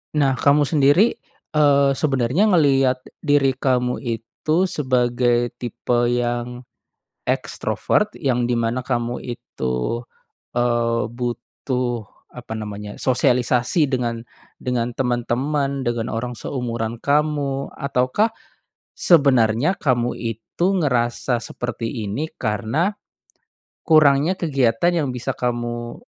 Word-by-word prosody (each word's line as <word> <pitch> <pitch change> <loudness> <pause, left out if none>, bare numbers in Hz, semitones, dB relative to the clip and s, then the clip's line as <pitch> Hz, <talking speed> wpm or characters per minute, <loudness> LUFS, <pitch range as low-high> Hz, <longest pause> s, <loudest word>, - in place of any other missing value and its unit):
Nah, 140 -3 +3
kamu 145 +1 +4
sendiri, 145 - +4 0.4
eee, 140 -2 +4
sebenarnya 135 - +1
ngelihat 135 -7 +3 0.2
diri 145 -3 +3
kamu 125 -1 0
itu 125 - -1
sebagai 120 -6 +1
tipe 120 0 0
yang 120 0 -2 0.7
ekstrovert, 210 0 0
yang 125 -4 0
di 120 - +1
mana 115 +2 0
kamu 120 0 -2
itu, 65 - -3 0.6
eee, 120 -1 +1
butuh, 120 -1 -3 0.2
apa 120 -2 -8
namanya, 105 -1 -6
sosialisasi 125 +3 +2
dengan 120 -2 -2 0.3
dengan 120 -1 -2
teman-teman, 135 +3 -1
dengan 120 0 -1
orang 120 +2 -3
seumuran 120 -3 -3
kamu? 145 -2 0
Ataukah, 140 - +1 0.6
sebenarnya 140 - +4
kamu 125 -6 0
itu 115 - -3
ngerasa 120 -3 0
seperti 120 -1 -4 0.2
ini, 150 +10 -3
karena 125 - 0 0.9
kurangnya 155 +3 +4
kegiatan 135 0 +2
yang 130 - -2
bisa 125 -1 -3
kamu 120 -1 -3
125 Hz, 100 wpm, -21 LUFS, 120-140 Hz, 0.9 s, kamu